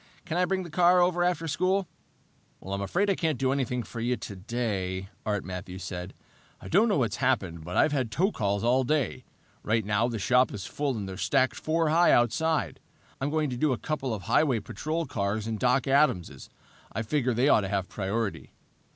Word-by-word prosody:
"Can 170 Hz, -2 st, -3 dB
I 180 Hz, +1 st, +3 dB
bring 190 Hz, 0 st, -1 dB
the 170 Hz, -, -9 dB
car 180 Hz, +2 st, +5 dB
over 175 Hz, 0 st, +3 dB
after 175 Hz, -2 st, 0 dB
school?" 185 Hz, +5 st, +1 dB, 0.7 s
"I'm 100 Hz, +1 st, -4 dB
afraid 175 Hz, -, 0 dB
I 200 Hz, -, +3 dB
can't 160 Hz, -6 st, -1 dB
do 130 Hz, +1 st, +1 dB
a 140 Hz, -1 st, +1 dB
thing 125 Hz, 0 st, -3 dB
for 115 Hz, +3 st, -8 dB
you 120 Hz, +2 st, 0 dB
today," 95 Hz, -2 st, -3 dB, 0.2 s
Art 105 Hz, -2 st, 0 dB
Matthews 90 Hz, 0 st, -7 dB
said. 90 Hz, 0 st, -6 dB, 0.4 s
"I -, -, -10 dB
don't 210 Hz, +7 st, +4 dB
know 205 Hz, -, +2 dB
what's 120 Hz, -5 st, 0 dB
happened, 100 Hz, -, 0 dB
but 90 Hz, +3 st, -4 dB
I've 155 Hz, -, +4 dB
had 130 Hz, -5 st, 0 dB
tow 185 Hz, -, +1 dB
calls 100 Hz, -, -1 dB
all 125 Hz, +3 st, +3 dB
day. 140 Hz, -3 st, -1 dB, 0.4 s
Right 110 Hz, -1 st, 0 dB
now 105 Hz, +3 st, +1 dB
the 120 Hz, -2 st, -3 dB
shop 125 Hz, +5 st, +3 dB
is 100 Hz, -, -6 dB
full 140 Hz, -4 st, -2 dB
and 100 Hz, -2 st, -4 dB
they're 95 Hz, -1 st, -7 dB
stacked 130 Hz, +5 st, +2 dB
four 160 Hz, 0 st, 0 dB
high 170 Hz, +3 st, +5 dB
outside. 150 Hz, +7 st, +1 dB, 0.4 s
I'm 135 Hz, -, 0 dB
going 155 Hz, -2 st, 0 dB
to 125 Hz, -, -3 dB
do 150 Hz, +1 st, +2 dB
a -, -, -2 dB
couple 135 Hz, +2 st, -3 dB
of 105 Hz, -4 st, -4 dB
highway 130 Hz, -, +2 dB
patrol 160 Hz, +10 st, -3 dB
cars 100 Hz, -1 st, -2 dB
and 110 Hz, -1 st, -3 dB
Doc 125 Hz, +1 st, +2 dB
Adams'. 100 Hz, -, +1 dB, 0.4 s
I 110 Hz, -, -3 dB
figured 125 Hz, 0 st, 0 dB
they 125 Hz, +4 st, +3 dB
ought 110 Hz, -, +5 dB
to 100 Hz, -, -4 dB
have 95 Hz, -2 st, -1 dB
priority." 105 Hz, +2 st, -3 dB
125 Hz, 205 wpm, -28 LUFS, 100-155 Hz, 0.7 s, car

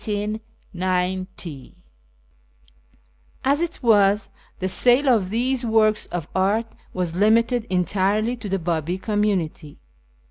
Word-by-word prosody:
ISFAHAN 210 Hz, 0 st, -3 dB, 0.3 s
209 185 Hz, -4 st, -3 dB, 1.7 s
As 280 Hz, +4 st, +2 dB
it 340 Hz, -5 st, -4 dB
was, 205 Hz, -2 st, +3 dB, 0.3 s
the 185 Hz, -, -2 dB
sale 245 Hz, +8 st, +4 dB
of 220 Hz, -8 st, +3 dB
these 250 Hz, +4 st, 0 dB
works 220 Hz, -2 st, +2 dB
of 170 Hz, -3 st, -5 dB
art 200 Hz, +5 st, +1 dB, 0.3 s
was 175 Hz, -2 st, -3 dB
limited 230 Hz, +2 st, +3 dB
entirely 195 Hz, +5 st, +1 dB
to 230 Hz, -4 st, -8 dB
the 195 Hz, -, 0 dB
Babi 170 Hz, 0 st, -2 dB
community. 190 Hz, -8 st, -2 dB
205 Hz, 110 wpm, -22 LUFS, 185-225 Hz, 1.7 s, sale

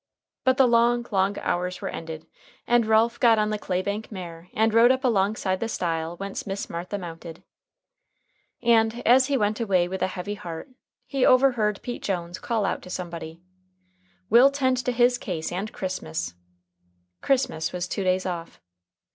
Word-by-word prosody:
But 260 Hz, 0 st, +3 dB
the 265 Hz, -, +6 dB
long, 235 Hz, 0 st, +3 dB
long 195 Hz, 0 st, +1 dB
hours 180 Hz, +1 st, -2 dB
were -, -, -4 dB
ended 160 Hz, -1 st, -6 dB, 0.4 s
and 240 Hz, -2 st, +3 dB
Ralph 225 Hz, +2 st, +3 dB
got 230 Hz, -2 st, +5 dB
on 215 Hz, 0 st, +1 dB
the 210 Hz, -, -2 dB
clay 185 Hz, -1 st, -2 dB
bank 205 Hz, +3 st, -4 dB
mare 175 Hz, -3 st, -8 dB
and 220 Hz, 0 st, +2 dB
rode 230 Hz, +2 st, +6 dB
up 260 Hz, +1 st, 0 dB
alongside 200 Hz, -4 st, +1 dB
the 230 Hz, -, -2 dB
stile 165 Hz, -3 st, -2 dB
whence 195 Hz, +1 st, -5 dB
Miss 195 Hz, 0 st, -4 dB
Martha 175 Hz, +4 st, -4 dB
mounted. 165 Hz, -2 st, -9 dB, 1.2 s
And 230 Hz, 0 st, +3 dB
as 255 Hz, +2 st, +6 dB
he 280 Hz, -, +1 dB
went 210 Hz, -1 st, 0 dB
away 190 Hz, -6 st, +2 dB
with 190 Hz, +1 st, -5 dB
a 185 Hz, -, +2 dB
heavy 185 Hz, +2 st, -5 dB
heart, 175 Hz, -, -7 dB, 0.4 s
he 270 Hz, -2 st, -1 dB
overheard 245 Hz, -6 st, +3 dB
Pete 245 Hz, -, -5 dB
Jones 175 Hz, -2 st, -3 dB
call 225 Hz, -4 st, -1 dB
out -, -, -2 dB
to -, -, -12 dB
somebody: 170 Hz, -2 st, -6 dB, 0.8 s
"We'll 240 Hz, +6 st, +7 dB
tend 260 Hz, -2 st, +1 dB
to 250 Hz, -, +1 dB
his 245 Hz, +1 st, +3 dB
case 165 Hz, -5 st, -4 dB
& 215 Hz, -, -9 dB
Christmas." 90 Hz, -, -4 dB, 0.9 s
Christmas 250 Hz, -12 st, 0 dB
was 180 Hz, 0 st, -3 dB
two 195 Hz, -, -3 dB
days 185 Hz, 0 st, +1 dB
off. 170 Hz, -2 st, -5 dB
200 Hz, 170 wpm, -25 LUFS, 180-235 Hz, 1.2 s, We'll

